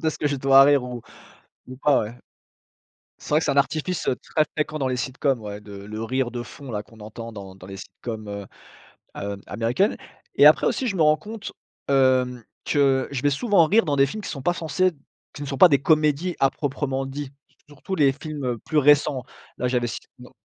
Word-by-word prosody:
de 160 - +2
ce - - -8
que 150 - 0
je 145 - -1
dois 135 0 +6
rire 140 -2 +4
ou 125 -2 -6 0.6
ou 130 - -9
pas, 140 +1 +3
ouais. 110 +3 -5 1.1
C'est - - -11
vrai 150 0 +4
que - - -3
c'est - - +1
un 140 - -1
artifice, 155 +5 0
heu, - - +2
très 155 +4 0
fréquent 155 0 -1
dans 135 - 0
les 130 -1 -1
sitcoms 130 0 -1
ouais, 105 -1 -7
de 105 -1 -12
le 105 +3 -7
rire 130 +1 -1
de 120 -1 -4
fond 135 +2 -10
là, 105 -1 -3
qu'on 110 0 -19
entend 115 +2 -8
dans 100 -3 -10
dans 95 -1 -13
les 95 - -8
sitcoms 110 +2 -8
heu, 100 -1 -6 0.7
hem, 100 0 -5
américaines 120 - 0 0.4
et - - +7
après, - - +6
aussi, 265 - 0
je 200 -5 -1
me 165 - +3
rends 155 0 +5
compte, 215 -1 -8 0.4
hem, 130 -3 +2 0.2
que 135 -3 +2
je 140 - -3
vais 145 - +3
souvent 195 - +3
rire 215 +6 +4
dans 145 -4 0
des 135 0 +5
films 215 +10 -6
qui - - -5
sont 140 - -6
pas 175 - +1
censés 170 +2 0 0.4
qui 145 - -8
ne - - -5
sont 135 - -4
pas 185 - +9
des 140 -4 +3
comédies 155 +3 +2
à 135 - +4
proprement 135 -2 -3
dit, 135 0 -6 0.4
surtout 145 +6 -6
les 140 -4 +4
films, 145 +1 -7
heu, 120 -2 -1
plus 155 - 0
récents 145 -2 +4 0.3
là, 125 - 0
j'avais 125 -1 0
c 115 - -4 0.2
no 125 0 -14
135 Hz, 225 wpm, -24 LUFS, 120-150 Hz, 1.1 s, pas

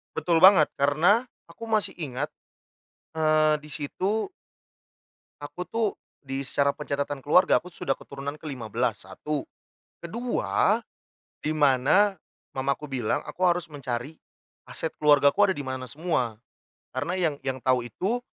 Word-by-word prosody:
Betul 170 -2 +2
banget, 185 -4 +7
karena 170 - +3 0.2
aku 230 - -9
masih 215 -2 +1
ingat, 145 -2 -3 0.8
eee, 155 -1 +3
di 150 - -12
situ 190 - -2 1.1
aku 180 +5 -6
tuh, 225 -2 0 0.4
di 135 0 -3
secara 140 +2 +2
pencatatan 145 -1 -3
keluarga, 180 +7 +4
aku 180 - -11
sudah 135 - -1
keturunan 140 +2 -7
ke-15, 120 - -3
satu. 145 +10 -4 0.6
Kedua 230 +2 0 0.6
di 155 - -1
mana 150 +9 +4 0.4
mamaku 140 +3 -1
bilang, 125 -6 -1
aku 185 - -7
harus 180 -1 +3
mencari 135 +1 -4 0.5
aset 160 - -2
keluargaku 150 +7 +5
ada - - 0
di 145 - -4
mana 130 -1 -4
semua. 130 -9 -1 0.6
Karena 145 +8 -2
yang 160 -5 +1
yang 130 -1 -2
tahu 130 -1 +3
itu 210 - -2
150 Hz, 125 wpm, -26 LUFS, 135-180 Hz, 1.1 s, banget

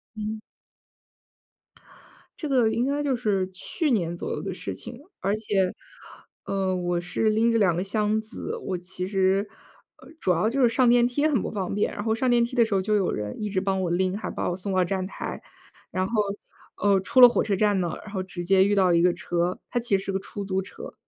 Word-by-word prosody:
嗯。 215 0 -4 2.0
这 305 - -4
个 250 -5 +3
应 235 +2 0
该 285 +2 0
就 275 -3 +1
是， 200 -6 0
去 295 - -2
年 175 -7 0
左 - - -5
右 - - -3
的 195 - -4
事 - - -5
情。 240 +1 -8 0.2
而 200 +2 0
且， 200 -4 0 0.7
呃， 190 -1 -1
我 175 -1 -1
是 180 +5 0
拎 225 +2 +3
着 230 - +2
2 185 -5 +3
个 180 - -1
箱 210 +2 0
子， 220 0 -6
我 185 - -3
其 180 +1 -4
实， 195 +1 +1 0.6
嗯， - - -14
主 185 - +1
要 180 +5 +2
就 270 +3 0
是 245 - +6
上 250 +1 +3
电 240 0 +5
梯 285 +5 +1
很 275 -9 +1
不 - - -4
方 195 -3 -3
便， 205 - 0
然 205 - -5
后 220 0 +1
上 255 +3 0
电 240 -1 +4
梯 240 +2 -3
的 235 -2 +5
时 220 - -3
候 195 - +2
就 210 +3 +1
有 195 -3 +1
人 105 0 -4
一 210 - -2
直 190 -2 0
帮 190 0 0
我 175 -2 -1
拎， 185 +2 0
还 - - -5
把 - - -2
我 180 - -3
送 195 +1 -3
到 185 -1 +3
站 185 +1 -2
台。 190 - -6 0.5
然 185 0 -1
后， 230 - -8 0.6
呃， 200 -1 +3
出 255 +7 +3
了 245 - +13
火 240 - +1
车 205 - 0
站 205 0 +2
呢， 170 -2 -2
然 210 - -11
后 190 -2 -2
直 185 -2 -6
接 190 +1 +4
遇 205 - +2
到 190 -3 +4
一 170 - +4
个 175 0 +4
车， 175 +1 -2
它 245 - 0
其 230 -4 +1
实 190 - -6
是 195 - -2
个 190 - -1
出 200 +1 -7
租 190 -1 -1
车， 190 - -9
200 Hz, 250 characters per minute, -25 LUFS, 185-225 Hz, 2.0 s, 了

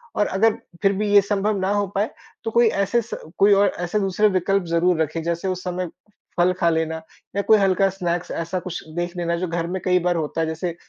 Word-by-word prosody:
और 205 - +2
अगर 215 +4 +3 0.3
फिर 195 0 +3
भी 210 - 0
ये 205 - +8
संभव 205 +1 0
ना 190 +1 0
हो 205 0 +1
पाए 205 +3 +1 0.3
तो 225 - -3
कोई 235 +1 +5 0.2
ऐसे 235 +5 +1
स 235 - -10 0.2
कोई 200 +1 +6
और 200 +1 +5
ऐसे 175 +4 -1
दूसरे 195 +2 +2
विकल्प 195 +1 +1
ज़रूर 170 0 +2
रखें 160 +1 -1
जैसे 170 +3 -2
उस 185 0 -3
समय 180 0 -3 0.5
फल 180 +1 +4
खा 170 - +3
लेना 160 0 0 0.4
या 200 - +2
कोई 220 - +8
हल्का 195 0 +3
स्नैक्स 175 -2 -3
ऐसा 170 +2 -3
कुछ 180 0 -6
देख 175 +1 -3
लेना 170 -1 0
जो 180 +1 -2
घर 170 0 -2
में 185 - -3
कई 180 0 +4
बार 175 - +2
होता 160 0 -2
है। 160 - 0
जैसे 165 +2 -3
185 Hz, 230 wpm, -22 LUFS, 170-200 Hz, 0.5 s, ये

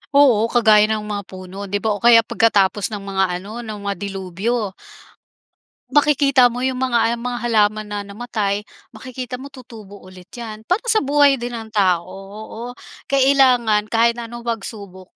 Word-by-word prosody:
Oo, 245 -6 +5
kagaya 215 -3 +4
ng 215 -1 -2
mga 205 -1 -4
puno 190 +1 -9
di 205 +1 -3
ba 220 - +1
o 205 - -2
kaya 230 -1 +6
pagkatapos 205 -4 +2
ng 205 -2 -7
mga 195 -1 0
ano, 190 +6 -6
ng 220 -3 -6
mga 200 0 -2
delubyo. 200 +3 -3 1.2
Makikita 280 -4 +4
mo 245 - -5
yung 260 0 -1
mga 235 -2 +1
ang 235 - -10
mga 245 -1 -3
halaman 215 -1 +1
na 205 0 -4
namatay, 205 -1 -3 0.3
makikita 250 +2 -7
mo 275 - -8
tutubo 230 -7 -13
ulit 185 -1 -14
yan. 220 -2 -8
Parang 380 +7 0
sa 440 - +4
buhay 285 -1 +3
din 240 0 -5
ng 225 -1 -8
tao, 185 -5 +2
oo. 215 +5 -9 0.3
Kailangan 255 -6 +3
kahit 235 +2 +2
na 235 - -6
anong 235 0 -9
pagsubok 200 -5 -7
220 Hz, 165 wpm, -20 LUFS, 200-245 Hz, 1.2 s, kaya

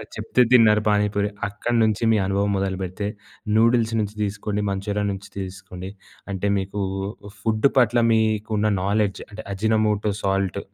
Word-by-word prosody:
చెప్తే 115 +3 +2
తిన్నారు 110 -4 +6
పానీపూరి. 105 0 +1 0.2
అక్కడ 110 +4 -3
నుంచి 110 +1 +1
మీ - - +3
అనుభవం 100 +1 0
మొదలుపెడితే 95 +1 -3 0.5
నూడిల్స్ 115 0 +3
నుంచి 105 0 -2
తీస్కొని 105 0 -2
మంచూరియా 100 +1 -2
నుంచి 95 0 -7
తీస్కొకోండి 95 -1 -7 0.4
అంటే, 95 +1 -2
మీకు 100 +1 -3 0.6
ఫుడ్ 110 +3 +2
పట్ల 120 -1 +4
మీకున్న 110 -1 +1 0.2
నోలెడ్జ్ 100 0 0
అంటే 105 +1 -9
అజినమోటో 105 0 +1
సాల్ట్ 95 -2 0
105 Hz, 130 wpm, -23 LUFS, 100-110 Hz, 0.6 s, తిన్నారు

